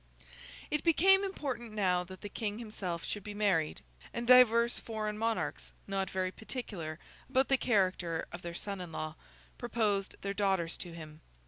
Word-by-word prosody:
It 300 0 +1
became 385 +4 +6
important 265 - -3
now 180 -4 +2
that 185 +1 -11
the 205 - -5
King 210 0 -3
himself 195 -7 -4
should 205 - -4
be 210 0 -6
married; 190 -7 +1 0.3
and 235 - -2
divers 235 -1 +6
foreign 215 -2 -3
Monarchs, 225 +1 -2
not 195 -1 -1
very 185 -1 -1
particular 195 -8 -5 0.3
about 265 0 +3
the 270 - +5
character 185 -8 +1
of 175 - -7
their 170 -1 -6
son 200 0 -4
in 175 -2 -7
law, 155 0 -4 0.5
proposed 215 -5 0
their 200 0 -1
daughters 190 -5 +1
to 175 - -7
him. 155 -1 -10
205 Hz, 160 wpm, -32 LUFS, 180-235 Hz, 0.5 s, became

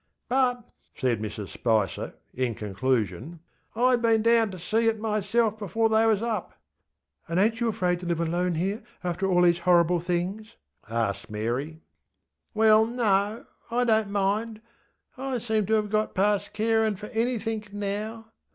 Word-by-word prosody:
ŌĆØ - - +2
ŌĆśBut, 255 -2 +3
ŌĆÖ 245 -1 -24
said 120 -5 +1
Mrs 105 -1 -5
Spicer, 110 -6 -1 0.2
in 125 -3 -1
conclusion, 120 - -2 0.4
ŌĆśIŌĆÖd 245 +1 +3
been 225 -1 +3
down 230 -1 +4
to 185 - -8
see 220 +6 0
it 225 -1 +1
myself 215 +1 0
before 225 +2 0
they 220 +1 +4
was 220 -1 +2
up. 220 -5 -3 0.7
ŌĆÖ 165 - -2
ŌĆśAnd - - +2
ainŌĆÖt 225 - -12
you 235 - +1
afraid 180 -5 0
to 180 - -8
live 170 -1 0
alone 175 +1 0
here, 195 +7 -1 0.2
after 180 +2 -1
all 180 -1 +4
these 175 -1 +4
horrible 175 0 +3
things? 180 +5 -3 0.3
ŌĆÖ - - -16
asked 100 -4 -2
Mary. 120 +9 -3 0.7
ŌĆśWell, 220 +1 +5
no; 210 -2 +1 0.2
I 240 +1 +1
donŌĆÖt 220 -3 +2
mind. 205 +3 -1 0.6
I 265 -1 -2
seem 220 -3 -1
to 220 - +1
have 210 -1 0
got 215 0 0
past 205 +1 +1
carinŌĆÖ 220 -1 +1
for 210 - -8
anythink 225 -2 -2
now. 210 +2 -4
205 Hz, 165 wpm, -26 LUFS, 175-225 Hz, 0.7 s, ŌĆśWell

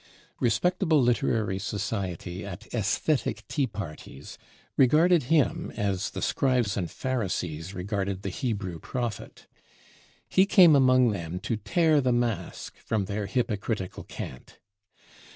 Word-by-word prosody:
Respectable 160 - +2
literary 115 -5 +1
society 95 -3 -4
at 95 -3 -9
"aesthetic 120 +6 0
tea 140 -4 0
parties" 80 - -8 0.4
regarded 155 +4 +4
him 165 +2 +2
as 100 -2 -1
the - - -5
Scribes 125 -6 +1
and 90 -4 -2
Pharisees 95 -8 -3
regarded 100 0 -3
the 95 - -2
Hebrew 100 -6 -3
prophet. 120 +2 -5 0.8
He 190 +1 +4
came 180 -6 +7
among 130 -3 +5
them 90 -2 -4
to 110 +2 -1
tear 150 - +2
the 130 -1 +1
mask 115 -7 -2
from 110 -3 -1
their 105 0 -3
hypocritical 105 -4 -2
cant. 65 - -9
110 Hz, 115 wpm, -27 LUFS, 95-130 Hz, 0.8 s, came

